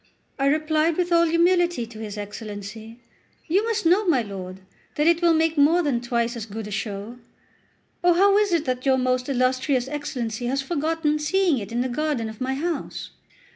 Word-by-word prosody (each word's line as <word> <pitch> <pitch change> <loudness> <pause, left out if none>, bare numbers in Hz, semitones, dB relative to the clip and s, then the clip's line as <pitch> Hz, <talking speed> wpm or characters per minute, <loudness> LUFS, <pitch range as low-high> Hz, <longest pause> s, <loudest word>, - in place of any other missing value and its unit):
I 275 - +2
replied 310 +2 +1
with 355 -1 0
all 335 0 +5
humility 345 -4 +2
to 225 -1 -12
his 215 -1 -6
Excellency: 210 +2 -8 0.5
"You 375 +6 +2
must 455 -6 -1
know, 365 +6 +4
my 270 -8 +3
lord, 190 -2 -8 0.3
that 300 - +1
it 340 +1 +4
will 340 -1 +4
make 320 -1 +1
more 330 +5 +4
than 265 -6 0
twice 240 0 -1
as 225 -1 -6
good 220 +1 -6
a 210 - -8
show. 210 +3 -5 0.8
Oh, 350 -1 +5
how 395 +2 +5
is 415 -2 +1
it 335 -3 +1
that 255 -1 -2
your 265 -1 +3
most 255 0 0
illustrious 255 0 +1
Excellency 255 -5 -4
has 270 +2 0
forgotten 305 +1 -1
seeing 340 -1 +2
it 200 -1 -8
in 240 +1 0
the 255 - 0
garden 255 -3 -2
of 220 +1 -11
my 265 +1 -1
house? 315 +1 -4
275 Hz, 190 wpm, -24 LUFS, 235-330 Hz, 0.8 s, all